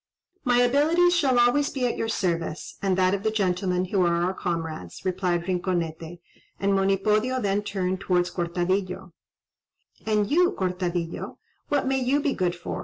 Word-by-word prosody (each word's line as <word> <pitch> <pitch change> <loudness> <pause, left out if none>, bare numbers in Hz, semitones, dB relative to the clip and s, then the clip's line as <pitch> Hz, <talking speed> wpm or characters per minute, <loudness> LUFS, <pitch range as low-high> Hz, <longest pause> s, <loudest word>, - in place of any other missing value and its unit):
"My 245 -3 +3
abilities 315 +8 +3
shall 270 -7 +2
always 245 +4 +3
be 260 -3 -2
at 240 - 0
your 225 - -2
service, 170 -6 -2
and 190 -2 +1
that 185 0 +3
of 200 - -1
the 220 - +1
gentlemen 185 -3 0
who 190 +1 0
are 170 0 +2
our 185 +2 0
comrades," 165 - -5
replied 180 -2 0
Rinconete; 175 -2 -3 0.4
and 200 0 +1
Monipodio 210 +6 +1
then 200 -3 0
turned 190 -2 -2
towards 180 -2 0
Cortadillo. 180 +1 -2 0.9
"And 210 -2 +2
you, 355 +4 +4
Cortadillo, 180 -2 -3 0.3
what 285 -2 +1
may 265 0 +1
you 260 +3 +1
be 285 -1 0
good 180 -1 -1
for?" 175 - -5
190 Hz, 160 wpm, -25 LUFS, 175-240 Hz, 0.9 s, you